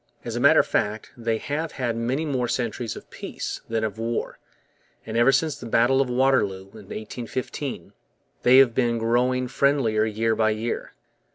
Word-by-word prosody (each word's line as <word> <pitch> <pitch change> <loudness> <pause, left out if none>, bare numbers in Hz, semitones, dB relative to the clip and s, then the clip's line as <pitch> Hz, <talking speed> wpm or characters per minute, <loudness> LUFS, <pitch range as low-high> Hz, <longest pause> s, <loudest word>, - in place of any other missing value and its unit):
As - - -4
a - - -1
matter - - +6
of - - -7
fact, 105 +1 -1
they 115 -2 -1
have 150 +6 -3
had 120 -4 -2
many 125 +7 -1
more 130 -5 -1
centuries 120 -1 -2
of - - -11
peace - - -6
than 115 -1 -1
of 110 0 -3
war; 115 +1 -3 0.7
and 110 - -6
ever 120 +3 +5
since 150 +2 +1
the 120 - -7
battle 120 +4 +3
of 135 - -1
Waterloo, 120 -7 +1
in 105 -2 -14
1815, 125 +5 -5 0.5
they 125 +1 +6
have 135 -3 +6
been 120 -1 +1
growing 125 +3 +1
friendlier 125 -5 +2
year 110 +1 0
by 110 0 +2
year. 110 +2 -3
120 Hz, 175 wpm, -24 LUFS, 110-130 Hz, 0.7 s, matter